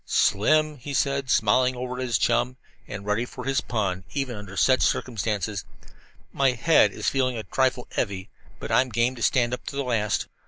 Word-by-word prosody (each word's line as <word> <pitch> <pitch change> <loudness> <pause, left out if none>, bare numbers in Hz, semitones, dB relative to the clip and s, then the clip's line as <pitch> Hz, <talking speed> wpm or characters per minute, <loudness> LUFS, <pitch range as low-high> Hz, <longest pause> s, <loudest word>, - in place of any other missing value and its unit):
"Slim," 155 +8 +2
he 140 +3 -5
said, 140 -1 0
smiling 125 +4 +3
over 125 0 -5
at - - -2
his 120 -2 +1
chum, 120 +2 +1 0.3
and 100 0 -7
ready 105 +3 0
for 125 - -8
his 135 0 +1
pun, 95 -6 -2
even 135 -4 -2
under 100 -2 -9
such 130 -1 +4
circumstances, 105 -4 -1 0.7
"my 135 -2 +2
head 155 +7 +4
is - - -5
feeling 130 -2 0
a 110 - -4
'trifle 130 +4 0
heavy,' 100 -4 -3 0.3
but - - -6
I'm 130 0 +3
game 120 +2 +1
to - - -9
stand 120 +1 +2
up 125 - -4
to - - -5
the 140 - -1
last." 110 -4 0
125 Hz, 190 wpm, -25 LUFS, 105-130 Hz, 0.7 s, such